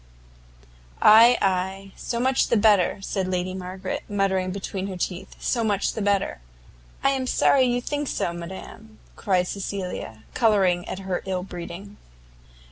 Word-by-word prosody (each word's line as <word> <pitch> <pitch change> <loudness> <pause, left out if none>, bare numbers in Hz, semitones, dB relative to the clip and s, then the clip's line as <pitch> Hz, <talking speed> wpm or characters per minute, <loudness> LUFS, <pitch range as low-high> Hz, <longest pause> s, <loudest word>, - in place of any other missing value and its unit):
"Ay, 230 +3 +8
ay, 190 -1 +1
and 195 - -15
so 235 - -4
much 260 +2 +2
the 235 - +2
better!" 205 -3 +4
said 195 -2 -2
Lady 185 0 -2
Margaret, 185 +1 -5
muttering 195 -2 0
between 195 0 -4
her 190 -2 -5
teeth, 180 +1 -4
"so 235 -2 0
much 205 -3 0
the 220 - -4
better!" 200 - 0 0.6
"I 275 - +4
am 265 -1 -1
sorry 260 +1 +4
you 245 0 +1
think 290 +3 -3
so, 170 - -1
madam," 190 +5 -9 0.2
cried 185 -3 +1
Cecilia, 185 - -5
colouring 195 -6 +2
at - - -4
her 190 -2 -3
ill 185 -1 -2
breeding. 185 +3 -8
195 Hz, 150 wpm, -24 LUFS, 185-220 Hz, 0.6 s, Ay